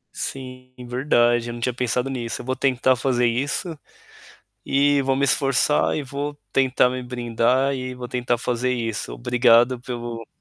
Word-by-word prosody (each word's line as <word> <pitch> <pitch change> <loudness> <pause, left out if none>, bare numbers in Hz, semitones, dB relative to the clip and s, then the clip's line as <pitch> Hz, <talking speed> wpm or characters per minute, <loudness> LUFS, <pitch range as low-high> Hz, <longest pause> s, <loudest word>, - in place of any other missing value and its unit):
Sim, 130 -1 -6 0.2
verdade, 120 -2 +2
eu - - -5
não - - -7
tinha 125 +1 -1
pensado 125 +1 -1
nisso, 120 -4 -4
eu - - -12
vou 130 +1 -1
tentar 130 -1 +2
fazer 125 -1 +1
isso, 140 +8 -1 0.9
e 140 +1 +3
vou 135 0 +1
me 140 +1 +1
esforçar 140 +2 +2
e 150 - -2
vou 145 +1 -5 0.2
tentar 130 -1 +3
me 130 0 -4
brindar 125 +2 0
e 130 -1 -4
vou 125 -1 -7
tentar 125 -1 -1
fazer 125 +1 -1
isso. 115 -4 -3
Obrigado 120 0 +3
pelo 120 -2 -6
125 Hz, 160 wpm, -22 LUFS, 120-135 Hz, 0.9 s, e